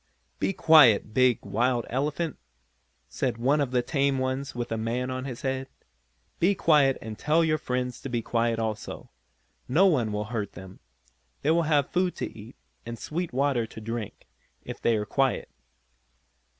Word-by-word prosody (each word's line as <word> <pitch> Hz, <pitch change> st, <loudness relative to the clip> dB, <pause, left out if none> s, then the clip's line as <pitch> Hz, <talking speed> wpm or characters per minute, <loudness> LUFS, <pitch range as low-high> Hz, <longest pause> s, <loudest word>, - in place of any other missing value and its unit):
"Be -, -, +1 dB
quiet, 135 Hz, -, +5 dB
big, 130 Hz, 0 st, +3 dB
wild 120 Hz, +2 st, 0 dB
elephant," 150 Hz, +5 st, -2 dB, 0.7 s
said 125 Hz, -4 st, -2 dB
one 135 Hz, +5 st, +2 dB
of 140 Hz, -, 0 dB
the 125 Hz, -1 st, +1 dB
tame 140 Hz, +1 st, +1 dB
ones 130 Hz, +1 st, -2 dB
with 120 Hz, -1 st, -4 dB
a -, -, 0 dB
man 120 Hz, +3 st, -2 dB
on 130 Hz, 0 st, -4 dB
his 125 Hz, -4 st, -7 dB
head. 130 Hz, 0 st, -2 dB, 0.7 s
"Be 195 Hz, +4 st, +3 dB
quiet 150 Hz, -7 st, +4 dB
and 110 Hz, -1 st, -7 dB
tell 160 Hz, +3 st, +3 dB
your 155 Hz, -1 st, +1 dB
friends 125 Hz, 0 st, -3 dB
to 135 Hz, -, -6 dB
be 120 Hz, -2 st, -2 dB
quiet 115 Hz, 0 st, 0 dB
also. 110 Hz, -2 st, -4 dB, 0.6 s
No 165 Hz, +10 st, +4 dB
one 130 Hz, -, +2 dB
will 105 Hz, 0 st, -2 dB
hurt 105 Hz, -3 st, -3 dB
them. 95 Hz, 0 st, -11 dB, 0.6 s
They 150 Hz, -, +3 dB
will 170 Hz, +1 st, +3 dB
have 145 Hz, -3 st, +2 dB
food 180 Hz, 0 st, +1 dB
to -, -, -5 dB
eat, 110 Hz, +2 st, -11 dB, 0.3 s
and 115 Hz, 0 st, -7 dB
sweet 165 Hz, +9 st, -4 dB
water 130 Hz, -3 st, +1 dB
to -, -, -10 dB
drink, 115 Hz, -1 st, -6 dB, 0.4 s
if -, -, -8 dB
they 115 Hz, -, +3 dB
are 105 Hz, -1 st, -1 dB
quiet." 135 Hz, +3 st, 0 dB
130 Hz, 170 wpm, -27 LUFS, 115-145 Hz, 0.7 s, quiet